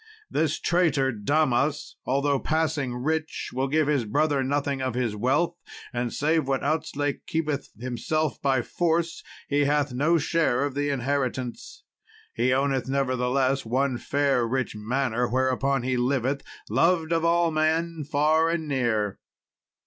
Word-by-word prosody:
This 155 -1 0
traitor 160 -7 +2
Damas, 140 +5 0
although 140 +1 +1
passing 155 -5 -1
rich, 155 +5 -2
will 130 +2 0
give 155 +2 +2
his 145 -4 +1
brother 145 +5 +1
nothing 140 0 -1
of 130 -2 -2
his 120 -4 -1
wealth, 135 +10 +1 0.4
and 120 -1 -2
save 155 0 +1
what 135 -1 0
Outzlake 145 -1 -2
keepeth 155 -3 -2
to 115 - -12
himself 130 +3 -1
by 135 -3 +2
force, 170 -1 0 0.3
he 145 0 +2
hath 145 -2 +1
no 155 +7 +3
share 145 -4 +1
of 145 - -3
the 145 +1 -1
inheritance. 130 -2 -3 0.5
He 125 +2 +1
owneth, 135 0 +1
nevertheless, 135 0 +1
one 130 +2 0
fair 140 -4 +1
rich 130 -2 -2
manor, 120 +2 -1
whereupon 130 +1 +1
he 130 0 0
liveth, 130 +2 0 0.3
loved 165 -1 +2
of 165 -1 +1
all 170 0 +3
men 160 +1 0
far 155 +3 +2
and 165 -2 -2
near. 115 -7 0
140 Hz, 140 wpm, -26 LUFS, 130-155 Hz, 0.5 s, no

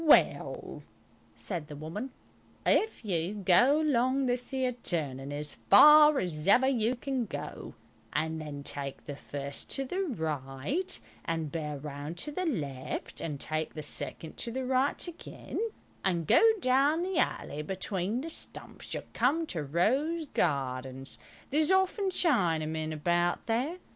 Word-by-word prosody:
"Well," 310 - +3 0.5
said 170 -6 -5
the 150 - -8
woman, 165 - -5 0.6
"if 440 - +2
you 180 0 -1
go 210 - +4
along 265 -2 +2
this 245 +1 -1
'ere 260 -1 0
turning 145 - -3
as 150 +1 -4 0.2
far 300 +7 +9
as 165 -6 -2
ever 245 +6 +6
you 245 -2 +2
can 260 -2 -2
go, - - -7 0.4
and 160 +1 -1
then 145 -2 -6
take 140 -1 -4
the 145 - -5
first 140 0 -3
to 270 - -2
the 370 +9 -2
right 160 - -2 0.2
and 165 -3 -2
bear 150 -2 -3
round 145 +3 -6
to 295 - -2
the 365 +4 -2
left, 140 - -3
and 150 -4 -4
take 155 +1 -2
the 155 - -5
second 155 +2 -4
to - - -3
the 260 +2 -3
right 260 +6 +1
again, 345 - -7 0.4
and 170 -4 +1
go - - +5 0.2
down 280 +5 +3
the 375 -1 0
alley 150 - -1
between 190 +6 -2
the 325 - -5
stumps, - - -8
you'll - - -4
come 285 +8 +2
to 170 - -4
Rose 265 - +1
Gardens. 135 - -2 0.3
There's 305 +2 +2
often 380 +1 +2
Chinamen 160 - +1
about 175 +3 0
there. 250 +10 0
190 Hz, 145 wpm, -30 LUFS, -, 0.6 s, far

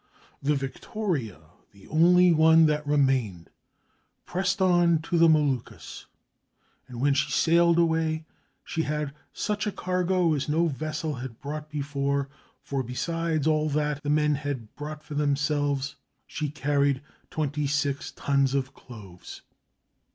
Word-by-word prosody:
The 145 +2 +1
Victoria, 135 - -3 0.3
the 100 -1 -17
only 180 +3 +5
one 160 0 +6
that 150 -1 0
remained, 130 - +1 0.7
pressed 185 +2 -1
on 175 -3 +4
to 170 - -2
the 165 0 +6
Moluccas; 145 -6 -1 0.8
and 125 -2 -9
when 140 +2 +3
she 140 +1 0
sailed 170 +2 +3
away, 160 -1 +1 0.4
she 165 - -2
had 150 -2 -2 0.2
such 210 0 -2
a - - 0
cargo 180 -2 0
as 145 -1 -2
no 165 +3 +2
vessel 155 +1 -3
had 120 -2 -8
brought 150 +1 -6
before, 140 -1 -2 0.3
for 140 -1 -2
besides 160 +5 -2
all 155 -1 +2
that 150 0 -1
the 145 - -4
men 150 0 +3
had 140 -6 -5
bought 150 +1 -7
for - - -9
themselves, 145 -1 0 0.3
she 150 -2 -4
carried 140 -1 0 0.3
twenty 150 -1 -2
six 140 -1 -1
tons 140 -1 +1
of 135 -1 -2
cloves. 100 -8 -12
150 Hz, 135 wpm, -26 LUFS, 140-160 Hz, 0.8 s, one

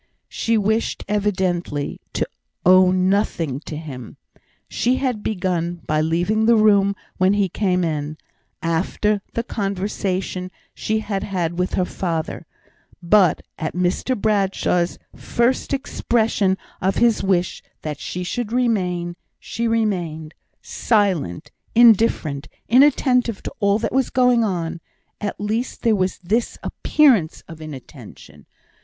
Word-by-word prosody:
She 230 0 0
wished 220 +2 0
evidently 185 -8 -1
to - - -1 0.4
owe 185 +1 +7
nothing 185 -6 +1
to 155 - -5
him. 135 -7 -8 0.5
She 250 +2 +1
had 255 -5 -1
begun 175 -4 -2
by 155 0 +1
leaving 175 +8 +1
the 235 - +6
room 200 -2 +4 0.2
when 185 +2 +3
he 205 -1 +2
came 180 -1 0
in, 155 -2 -2 0.5
after 195 +5 0
the 230 - -1
conversation 195 -3 -3 0.2
she 220 0 -1
had 200 -3 -3
had 180 -4 -2
with 180 - 0
her 185 - +1
father; 165 -4 -3 0.6
but 180 -2 +4 0.2
at 160 - -3
Mr 180 +7 0
Bradshaw's 195 -4 +1 0.2
first 240 +2 0
expression 220 -7 0 0.2
of 190 +1 +1
his 235 -2 +3
wish 185 -2 0 0.2
that 150 -2 -4
she 180 - -4
should 220 +5 -3
remain, 180 -8 0 0.2
she 235 0 -3
remained 175 -9 -1 0.3
silent, 190 - 0 0.2
indifferent, 220 -11 +4 0.2
inattentive 250 -3 +3
to - - -6
all 200 -1 +3
that 225 - -3
was 265 0 +2
going 250 -2 +3
on; 170 -5 -2 0.4
at 205 - -4
least 220 +5 -3
there 230 -3 +4
was 185 -1 0
this 225 +7 0
appearance 245 - +2
of 165 -1 -11
inattention. 130 - -11
195 Hz, 125 wpm, -21 LUFS, 175-220 Hz, 0.6 s, owe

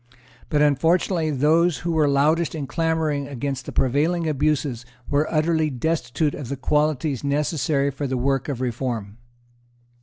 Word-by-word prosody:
But 150 -1 +3
unfortunately 165 +3 +2
those 155 +4 +3
who 170 - 0
were 155 -2 +3
loudest 150 +4 +2
in 150 -3 -3
clamouring 160 -2 -1
against 135 -1 -4
the - - -4
prevailing 155 +6 +1
abuses 145 -4 0 0.2
were 145 +2 0
utterly 160 0 +1
destitute 145 +1 -1
of 135 -5 -7
the 140 - -3
qualities 150 -1 0
necessary 140 0 0
for 140 +1 -4
the 130 -1 -2
work 135 +2 0
of 130 -3 -3
reform. 120 -4 -3
145 Hz, 145 wpm, -23 LUFS, 135-160 Hz, 0.2 s, But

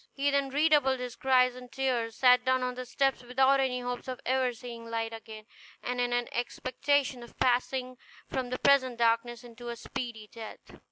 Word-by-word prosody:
He 285 +1 +1
then 280 -1 +1
redoubled 290 -2 +3
his 250 -1 -5
cries 255 -1 +3
and 250 -1 -11
tears, 250 -4 -1
sat 250 -1 +5
down 260 0 +2
on 250 0 -1
the 250 0 -7
steps 270 +1 +1
without 265 +2 +3
any 255 -2 0
hopes 245 +1 -4
of 255 -1 -5
ever 260 0 +2
seeing 235 -1 -9
light 225 0 -2
again, 220 -1 -9 0.4
and 250 0 -2
in 245 0 0
an 245 0 0
expectation 255 +2 -1
of 235 - -13
passing 255 0 0 0.3
from 255 -2 -3
the 255 - -2
present 260 -3 +3
darkness 235 +1 +1
to 240 +1 -8
a 235 - -4
speedy 235 -1 -6
death. 225 -2 -10
250 Hz, 185 wpm, -29 LUFS, 240-265 Hz, 0.4 s, sat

